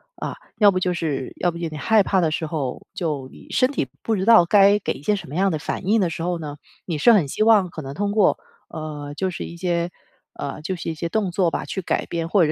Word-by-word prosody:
啊， -, -, -5 dB, 0.2 s
要 205 Hz, -2 st, +6 dB
不 185 Hz, -, -2 dB
就 180 Hz, -1 st, 0 dB
是 150 Hz, -6 st, -3 dB
要 175 Hz, -, +1 dB
不 170 Hz, -, -8 dB
就 170 Hz, -1 st, -3 dB
你 155 Hz, -, -7 dB
害 220 Hz, +6 st, +4 dB
怕 190 Hz, 0 st, +2 dB
的 165 Hz, -3 st, +2 dB
时 160 Hz, -, -2 dB
候， 150 Hz, -5 st, -4 dB
就 150 Hz, -7 st, -3 dB
你 -, -, -15 dB
身 255 Hz, +1 st, +2 dB
体 145 Hz, -, -1 dB, 0.2 s
不 225 Hz, -, 0 dB
知 190 Hz, -, -1 dB
道 225 Hz, -5 st, +8 dB
该 200 Hz, +2 st, +6 dB
给 -, -, -2 dB
一 -, -, -6 dB
些 205 Hz, +8 st, +1 dB
什 195 Hz, -, -7 dB
么 145 Hz, -, -7 dB
样 195 Hz, +2 st, +2 dB
的 -, -, 0 dB
反 180 Hz, +4 st, -4 dB
应 220 Hz, +1 st, +4 dB
的 180 Hz, -, +1 dB
时 165 Hz, -, -5 dB
候 175 Hz, +1 st, -1 dB
呢， 150 Hz, -2 st, -7 dB, 0.3 s
你 165 Hz, -4 st, -3 dB
是 235 Hz, +10 st, +6 dB
很 175 Hz, -10 st, +3 dB
希 215 Hz, -, 0 dB
望 215 Hz, -5 st, +5 dB
可 160 Hz, -, -7 dB
能 135 Hz, 0 st, -7 dB
通 205 Hz, +5 st, -1 dB
过， 205 Hz, -2 st, +3 dB, 0.3 s
呃， 150 Hz, -3 st, -6 dB
就 190 Hz, +4 st, -1 dB
是 180 Hz, -, -5 dB
一 170 Hz, -, -9 dB
些， 170 Hz, -1 st, -1 dB, 0.4 s
呃， 140 Hz, +2 st, -6 dB
就 185 Hz, +5 st, -3 dB
是 170 Hz, -, -5 dB
一 -, -, -4 dB
些 170 Hz, +2 st, -3 dB
动 195 Hz, +1 st, -1 dB
作 180 Hz, -1 st, +2 dB
吧， -, -, -3 dB
去 190 Hz, -, -4 dB
改 -, -, -1 dB
变， 165 Hz, -1 st, -3 dB
或 190 Hz, +3 st, +3 dB
者 155 Hz, -, 0 dB
175 Hz, 295 characters per minute, -22 LUFS, 155-195 Hz, 0.4 s, 道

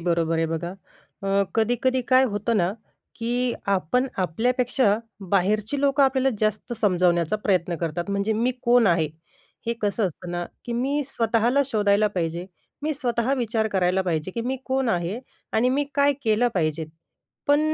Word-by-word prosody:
बरोबर 165 Hz, -1 st, +1 dB
आहे 165 Hz, 0 st, +1 dB
बघा. 165 Hz, +2 st, -3 dB, 0.5 s
अ, 195 Hz, 0 st, +2 dB
कधी-कधी 245 Hz, +3 st, +1 dB
काय 260 Hz, 0 st, +6 dB
होतं 210 Hz, +3 st, 0 dB
ना 180 Hz, -1 st, +2 dB, 0.4 s
की 245 Hz, +1 st, 0 dB, 0.2 s
आपण 195 Hz, +8 st, +1 dB
आपल्यापेक्षा, 240 Hz, -, +2 dB, 0.4 s
बाहेरची 210 Hz, +7 st, +1 dB
लोकं 280 Hz, 0 st, +3 dB
आपल्याला 265 Hz, 0 st, +2 dB
जास्त 215 Hz, +2 st, -1 dB
समजावण्याचा 180 Hz, -2 st, +2 dB
प्रयत्न 180 Hz, -3 st, +1 dB
करतात; 170 Hz, +3 st, -3 dB
म्हणजे 200 Hz, +2 st, 0 dB
मी 230 Hz, +4 st, +1 dB
कोण 240 Hz, -1 st, +5 dB
आहे 165 Hz, -4 st, +3 dB, 0.6 s
हे? 235 Hz, -, +1 dB
कसं 205 Hz, 0 st, +1 dB
असतं 175 Hz, 0 st, -7 dB
ना, 175 Hz, 0 st, -2 dB, 0.2 s
की 240 Hz, -, -4 dB
मी 270 Hz, +5 st, 0 dB
स्वतःला 235 Hz, +1 st, +2 dB
शोधायला 210 Hz, -4 st, +2 dB
पाहिजे. 170 Hz, 0 st, -2 dB, 0.4 s
मी 310 Hz, +1 st, 0 dB
स्वतः 245 Hz, -2 st, 0 dB
विचार 225 Hz, -4 st, 0 dB
करायला 190 Hz, -1 st, +1 dB
पाहिजे, 170 Hz, -1 st, -2 dB
की 230 Hz, -, -4 dB
मी 255 Hz, +3 st, -2 dB
कोण 265 Hz, -1 st, 0 dB
आहे? 180 Hz, +3 st, -1 dB, 0.3 s
आणि 230 Hz, +3 st, +3 dB
मी 280 Hz, +3 st, +1 dB
काय 285 Hz, 0 st, +4 dB
केलं 225 Hz, +1 st, +3 dB
पाहिजे? 160 Hz, -2 st, 0 dB, 0.6 s
पण 290 Hz, 0 st, +4 dB
215 Hz, 155 wpm, -24 LUFS, 180-250 Hz, 0.6 s, काय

